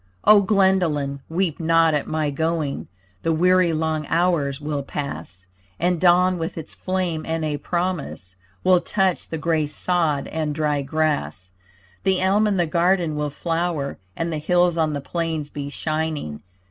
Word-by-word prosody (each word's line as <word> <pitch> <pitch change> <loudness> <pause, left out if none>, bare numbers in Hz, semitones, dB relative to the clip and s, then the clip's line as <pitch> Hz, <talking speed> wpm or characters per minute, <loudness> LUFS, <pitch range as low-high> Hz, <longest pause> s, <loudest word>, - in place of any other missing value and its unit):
O 210 -1 +7
Glendolyn, 185 -9 +2
weep 170 -1 -1
not 165 -1 +3
at 150 - -1
my 155 -2 -1
going, 160 -1 -2 0.3
The 165 - 0
weary 180 +2 +4
long 155 -1 -1
hours 160 -5 +1
will 145 -1 -3
pass; 135 -10 -6 0.3
And 175 -1 +1
dawn 180 0 +4
with 165 +1 -4
its 160 - -7
flame 185 -4 -2
and 160 -1 -2
a 150 -1 -1
promise 170 - -3 0.3
Will 185 -1 +5
touch 190 +1 0
the 160 - -3
grey 160 -1 0
sod 150 -2 0
and 155 -2 -2
dry 150 -2 0
grass. 135 - -1 0.5
The 190 -1 +2
elm 200 +3 +3
in 200 -2 +1
the 175 - +2
garden 170 0 +1
will 150 0 -1
flower 165 -1 -2 0.2
And 165 0 -2
the 155 - -2
hills 175 +2 +2
on 160 -2 +1
the 145 - -3
plains 160 -1 -3
be 145 -1 -5
shining. 155 - -3
160 Hz, 160 wpm, -22 LUFS, 150-175 Hz, 0.5 s, O